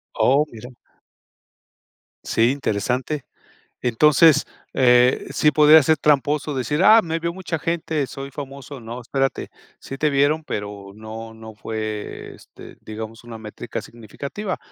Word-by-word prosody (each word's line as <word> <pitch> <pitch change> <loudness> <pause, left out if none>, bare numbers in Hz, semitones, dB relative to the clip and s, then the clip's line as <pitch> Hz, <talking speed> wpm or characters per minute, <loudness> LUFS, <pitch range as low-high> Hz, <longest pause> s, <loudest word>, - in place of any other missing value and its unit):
Oh, 140 +4 +3
mira. 120 +3 -11 1.5
Sí, 115 +2 +2
interesante, 130 +2 -2 0.6
entonces, 150 +6 +5 0.3
eh, 125 -1 +4
sí 150 - +3
podría 150 +1 +7
ser 155 +3 +3
tramposo 150 0 +1
decir: 135 +5 -1
"Ah, 220 +3 +8
me 165 -3 -3
vio 170 +1 -3
mucha 175 -3 -4
gente, 160 -3 -2
soy 135 +1 -8
famoso", 140 -1 -8
no, 120 +2 -8
espérate, 135 +2 -2 0.3
sí 135 - -8
te 150 +2 +1
vieron, 145 +3 +1
pero 100 -3 -6
no 110 +1 -9
no 110 0 -11
fue, 110 -1 -6
este, - - -15
digamos, 110 +2 -8
una 115 -1 -8
métrica 110 +1 -7
significativa, 140 - -6
135 Hz, 130 wpm, -22 LUFS, 115-150 Hz, 1.5 s, Ah